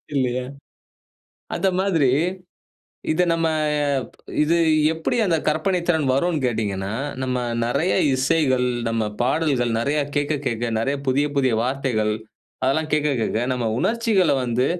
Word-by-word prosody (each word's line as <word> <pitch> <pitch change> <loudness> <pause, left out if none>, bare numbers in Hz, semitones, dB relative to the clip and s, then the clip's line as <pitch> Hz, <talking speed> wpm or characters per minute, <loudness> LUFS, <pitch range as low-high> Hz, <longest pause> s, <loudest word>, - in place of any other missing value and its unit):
இல்லையா? 125 -1 0 1.1
அந்த 195 - +1
மாதிரி 165 -10 +2 1.0
இத 180 +3 +2
நம்ம 165 0 +1 1.0
இது 165 +3 +2 0.4
எப்டி 160 +8 -2
அந்த 165 -3 +2
கற்பனைத்திறன் 160 -1 +1
வரும்னு 165 +3 +1
கேட்டீங்கன்னா, 100 -4 -2 0.3
நம்ம 125 -1 -1 0.2
நெறைய 160 +9 +1 0.2
இசைகள், 130 -2 +2 0.2
நம்ம 115 -1 0 0.2
பாடல்கள் 130 -3 +1
நெறைய 145 +5 0 0.2
கேட்க 145 +1 +1
கேட்க, 120 -1 -1
நெறைய 135 +5 0
புதிய, 140 +3 +2
புதிய 130 -4 +2
வார்த்தைகள். 125 -5 0 0.5
அதெல்லாம் 150 +4 +1
கேட்க 150 -1 +2
கேட்க 110 - 0
நம்ம 120 -2 -2
உணர்ச்சிகள 225 -5 +2
வந்து 125 +1 0
140 Hz, 120 wpm, -22 LUFS, 125-160 Hz, 1.1 s, மாதிரி